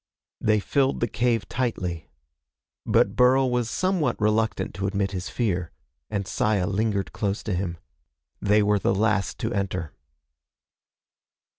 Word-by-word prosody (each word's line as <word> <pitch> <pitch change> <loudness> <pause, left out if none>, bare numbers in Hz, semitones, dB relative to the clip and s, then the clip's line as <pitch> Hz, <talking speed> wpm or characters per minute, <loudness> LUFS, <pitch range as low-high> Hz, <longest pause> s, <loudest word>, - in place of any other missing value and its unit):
They 110 0 +3
filled 135 +5 +1
the 120 - +1
cave 115 -2 0
tightly. 90 -10 -3 0.8
But - - +3
Burl 130 +1 +4
was 120 -2 0
somewhat 185 +1 0
reluctant 105 -2 +1
to 95 +2 -2
admit 100 -1 -1
his 90 -3 -4
fear, 95 -8 -1 0.4
and 100 -3 -2
Saya 105 -3 +1
lingered 100 0 -1
close 100 0 -2
to 105 - -2
him. 90 -1 -2 0.6
They 105 +1 +4
were 105 0 +3
the - - +1
last 105 -2 +1
to - - -1
enter. 90 -5 -2
105 Hz, 135 wpm, -25 LUFS, 95-115 Hz, 0.8 s, Burl